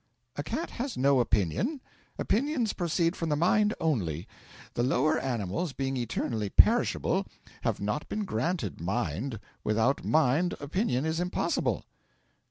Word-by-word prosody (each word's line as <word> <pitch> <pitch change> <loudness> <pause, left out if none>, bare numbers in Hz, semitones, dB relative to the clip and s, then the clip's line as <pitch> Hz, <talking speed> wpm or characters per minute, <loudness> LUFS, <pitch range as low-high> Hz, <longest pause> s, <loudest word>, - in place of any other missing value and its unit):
'A - - -2
cat 300 - -3
has 255 0 -4
no 135 +1 +4
opinion; 120 - +1 0.4
opinions 250 -1 +1
proceed 170 0 +1
from 165 - -2
the 150 - +2
mind 205 +7 +3
only; 90 - -1 0.5
the - - 0
lower 135 +5 +2
animals, 120 - -2
being 135 +1 -2
eternally 115 -3 -2
perishable, - - +3 0.3
have - - 0
not 105 +9 -2
been 210 -1 -2
granted 125 - -2
mind; 105 - -2 0.2
without 110 +6 +2
mind 160 +4 +3
opinion 145 - 0
is 160 +1 0
impossible.' 180 +1 0
140 Hz, 130 wpm, -29 LUFS, 115-175 Hz, 0.5 s, no